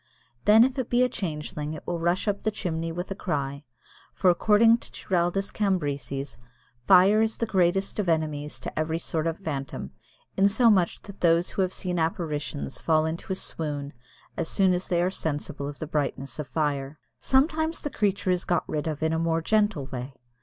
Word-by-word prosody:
Then 220 +2 +8
if 265 +2 0
it 255 - -2
be 245 +1 +4
a 250 - +2
changeling 150 -5 -4
it 150 - -10
will 175 -1 -2
rush 175 +5 0
up 200 -1 0
the 220 - +1
chimney 165 -5 -3
with 175 +3 -5
a - - -2
cry, 140 -5 -3 0.5
for, 185 -2 +4
according 225 +5 +5
to - - -11
Giraldus 180 +2 -1
Cambrensis, 145 -8 -2 0.4
"fire 190 - +6
is 220 0 0
the 230 - 0
greatest 195 -1 +1
of 190 -4 0
enemies 150 -2 -1
to - - -5
every 160 +1 0
sort 165 -1 -2
of 165 0 -2
phantom, 140 -8 -5 0.4
in 195 +1 +5
so 230 +3 +5
much 185 -4 +1
that 200 -1 -12
those 170 0 +3
who - - -1
have 185 -1 +1
seen 180 -2 -2
apparitions 150 - -3
fall 155 -1 +3
into 165 +4 -4
a - - +1
swoon 145 -5 -4 0.4
as 160 - -1
soon 190 -2 +3
as 180 +1 -2
they 175 -1 +1
are 185 - +1
sensible 145 -4 -3
of 145 0 -7
the - - -4
brightness 140 -2 -3
of 150 - -4
fire." 145 -2 -2 0.2
Sometimes 315 +4 +1
the 290 - -3
creature 200 -2 0
is 180 0 0
got 175 - 0
rid 150 0 -2
of 155 -1 -3
in 160 0 +1
a 160 - 0
more 165 0 0
gentle 210 -7 +1
way. 130 0 -6
170 Hz, 195 wpm, -26 LUFS, 150-195 Hz, 0.5 s, Then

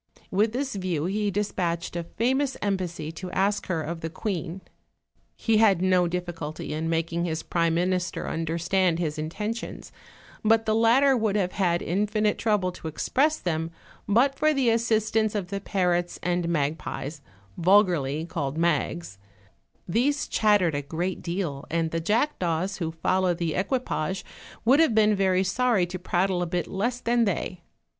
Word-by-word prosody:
With 210 +4 +2
this 265 +3 -2
view 180 -6 -2
he 205 +3 0
dispatched 175 -4 -2
a 170 - -2
famous 265 +8 0
embassy 180 -6 -2
to 180 +3 -7
ask 200 +2 +1
her 165 -4 -1
of 165 +2 -5
the 165 - -3
queen; 185 0 -4 0.7
he 225 -2 +1
had 210 -5 +5
no 185 -1 +3
difficulty 170 -4 -4
in 160 +1 -2
making 165 +1 0
his 160 -1 -3
prime 170 -1 +1
minister 180 0 -1
under 165 0 -2
stand 175 0 +2
his 155 -3 -2
intentions, 210 +9 -5 0.5
but 225 +1 +4
the 215 - +2
latter 240 +5 +5
would 220 -4 0
have 185 -3 +1
had 175 -3 +1
in 195 +5 0
finite 210 0 0
trouble 210 -5 +1
to 170 - -8
express 290 - +1
them, 165 -2 -2 0.4
but 240 +7 +4
for 310 +2 +2
the 255 -4 +3
assistance 220 -1 +1
of 190 -4 -2
the 200 0 -3
parrots 180 -3 0
and 175 -1 0
magpies, 150 -1 -2 0.3
vulgarly 170 -6 +3
called 155 -4 -3
mags; 165 - -1 0.7
these 265 +10 +1
chattered 205 -6 +3
a 145 - -1
great 170 +6 -3
deal, 170 -6 -3
and 165 -1 0
the 165 - -1
jackdaws 190 - 0
who 165 -3 -2
followed 180 +2 +1
the 170 -3 -1
equipage 190 - -1 0.4
would 265 +5 +5
have 320 -9 +4
been 215 -1 +5
very 190 -2 +2
sorry 215 -1 +2
to 185 +1 -6
prattle 180 +1 0
a 175 - -1
bit 175 0 -1
less 235 +6 -2
than 235 -1 +2
they. 180 -2 -2
185 Hz, 160 wpm, -26 LUFS, 170-215 Hz, 0.7 s, had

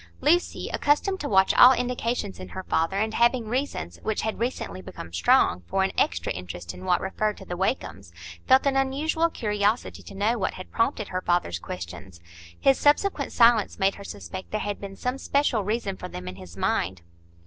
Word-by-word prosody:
Lucy, 345 +4 +1
accustomed 380 +7 +1
to 290 - -3
watch 190 -1 +4
all 250 +1 +9
indications 240 - -2
in 90 0 -8
her 190 - -6
father, 165 +2 0
and 220 +2 0
having 235 0 +2
reasons, 220 - -3
which 220 - -2
had 220 0 -2
recently 225 - -3
become 85 -2 -10
strong, 85 +1 +3
for 195 - +1
an 190 - 0
extra 85 0 0
interest 90 -1 -7
in 90 +1 -10
what - - +3
referred 210 +2 -2
to 195 - -11
the 175 - -5
Wakems, 175 - -2 0.4
felt 260 +1 +5
an 275 -1 +2
unusual 295 +5 +1
curiosity 210 -4 -1
to - - -12
know 220 +4 +1
what 190 - -1
had 185 - -10
prompted 225 -2 0
her 185 0 -2
father's 175 - 0
questions. 85 +1 -8 0.4
His 270 -1 +4
subsequent 295 0 +2
silence 230 -3 +4
made 195 0 +2
her 200 - -10
suspect 100 - -8
there 215 - -2
had 205 -1 -4
been 195 -1 -7
some 250 +5 -3
special 280 -8 +1
reason 210 -1 -2
for 180 - -6
them 90 - -8
in 90 0 -6
his 90 -1 -12
mind. 95 -1 -1
200 Hz, 190 wpm, -26 LUFS, -, 0.4 s, all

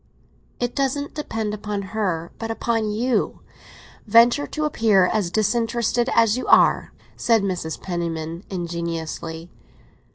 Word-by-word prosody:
"It 245 0 -1
doesn't 280 +1 -1
depend 225 -8 -3
upon 210 -1 -4
her, 170 -6 -1
but 225 - -4
upon 225 -1 -1
you. 235 +4 0 0.7
Venture 235 +6 +5
to 305 -1 -2
appear 220 -10 +3
as 200 -2 0
disinterested 235 +3 +1
as 230 +1 +4
you - - -5
are!" - - +4 0.2
said 225 -3 +2
Mrs. 180 -5 -3
Penniman 170 -1 -4
ingeniously. 170 -2 -4
210 Hz, 120 wpm, -23 LUFS, 175-235 Hz, 0.7 s, Venture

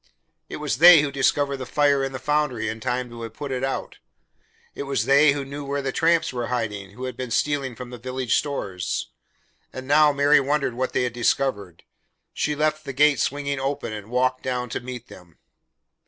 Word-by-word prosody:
It - - -6
was 120 - -3
they 170 -1 +9
who 145 - -2
discovered 140 +1 +1
the 130 - -6
fire 145 -2 +2
in 135 - -2
the 130 - -5
foundry 150 -3 -1
in 110 0 -5
time 125 +1 -2
to 120 0 -9
have 115 -1 -7
it - - -29
put 145 -2 -5
out. 130 +1 -3 0.7
It - - -7
was 135 - 0
they 140 +1 +5
who 140 -1 -4
knew 140 +2 -7
where 140 0 -3
the 135 - -1
tramps 165 0 +2
were 120 -2 -3
hiding 105 -5 -3
who 125 - -8
had 130 0 -4
been 130 -1 -5
stealing 135 0 -1
from 125 +1 -9
the 125 - -8
village 130 0 -2
stores, 100 -11 -3 0.6
and 130 0 -8
now 150 +1 +5
Mary 145 +1 +4
wondered 140 -2 0
what 130 +2 -3
they - - +1
had 125 -2 -2
discovered. 115 -7 -1 0.5
She 150 - -1
left 155 +1 0
the 135 - -6
gate 145 0 +4
swinging 140 0 -1
open 135 -4 -3
and 105 0 -8
walked 130 +1 +1
down 125 -2 -3
to - - -3
meet 125 -1 -8
them. 85 -3 -15
135 Hz, 205 wpm, -23 LUFS, 125-145 Hz, 0.7 s, they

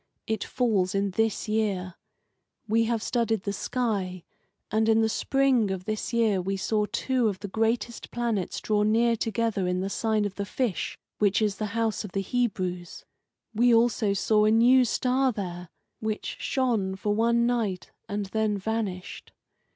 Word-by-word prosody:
It 220 -3 -2
falls 210 -7 0
in 195 0 0
this 225 +2 0
year. 200 -4 -1 0.7
We 225 +1 +3
have 225 -1 -1
studied 225 -4 0
the 200 - -2
sky, 195 -6 -2 0.5
and 220 +1 +2
in 225 0 +4
the 220 - +3
spring 265 -3 +2
of 190 -1 -4
the 215 0 -1 0.2
year 225 -5 +2
we 195 +2 -2
saw 210 +2 0
two 255 -3 +1
of 200 -3 -1
the 205 - -6
greatest 225 +3 -1
planets 230 -6 -2
draw 210 -1 +1
near 230 +3 +3
together 225 -4 -1
in 180 0 0
the 195 +1 -3
sign 220 -1 0
of 205 - -3
the 200 +1 -4
Fish, 235 -4 -2 0.2
which 205 -2 +3
is 210 -3 0
the 215 - -2
house 225 -2 0
of 205 - -8
the 195 - 0
Hebrews. 185 -6 -2 0.5
We 235 +2 +4
also 225 -3 +2
saw 210 +1 +2
a - - +4
new 245 +3 +6
star 255 +3 +1
there, 180 -5 -6 0.3
which 220 -1 -3
shone 225 -8 0
for 205 +2 -1
one 235 +2 +2
night 225 -7 -1 0.2
and 205 0 -2
then 215 +1 0
vanished. 200 -3 -4
215 Hz, 165 wpm, -27 LUFS, 195-230 Hz, 0.7 s, new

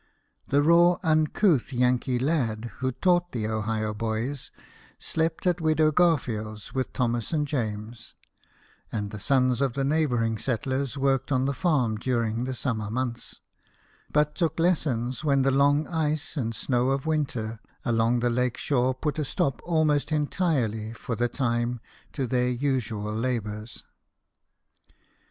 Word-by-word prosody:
The 145 +1 +3
raw, 170 +2 +5
uncouth 155 - +2
Yankee 125 0 +1
lad 120 -5 -1
who 130 0 -1
taught 175 +5 +1
the 115 -3 -2
Ohio 110 0 -1
boys, 115 +5 -3 0.5
slept 160 +2 -2
at 180 -1 +1
Widow 155 -1 +3
Garfield's, 115 - 0
with 130 -1 -2
Thomas 120 -3 -1
and 150 -2 0
James; 110 -4 -4 0.8
and 105 -2 -3
the 110 - -6
sons 130 +1 +2
of 135 -3 +1
the 135 - -1
neighbouring 125 -7 +1
settlers 130 +2 -2
worked 135 0 +1
on 130 -1 +2
the 140 - 0
farm 130 -9 +1
during 115 -1 -1
the 130 0 -3
summer 110 -6 -2
months, 120 +1 -4 0.7
but 150 0 +2
took 160 -1 -1
lessons 140 -8 +1
when 140 -3 +3
the 135 - +3
long 145 +2 +3
ice 155 -2 -1
and 115 -6 -2
snow 125 +1 +1
of 135 +1 -1
winter 125 -8 -1 0.3
along 115 +1 +2
the 120 - +2
lake 125 0 0
shore 130 -2 +1
put 150 +3 -2
a - - +1
stop 135 -1 -1
aLnost 155 -3 +2
entirely 140 - 0
for 115 0 -4
the 120 +2 0
time 120 -1 -1 0.3
to 135 - -1
their 125 0 +1
usual 120 -5 -1
labours. 110 -2 -3
130 Hz, 140 wpm, -26 LUFS, 115-150 Hz, 0.8 s, raw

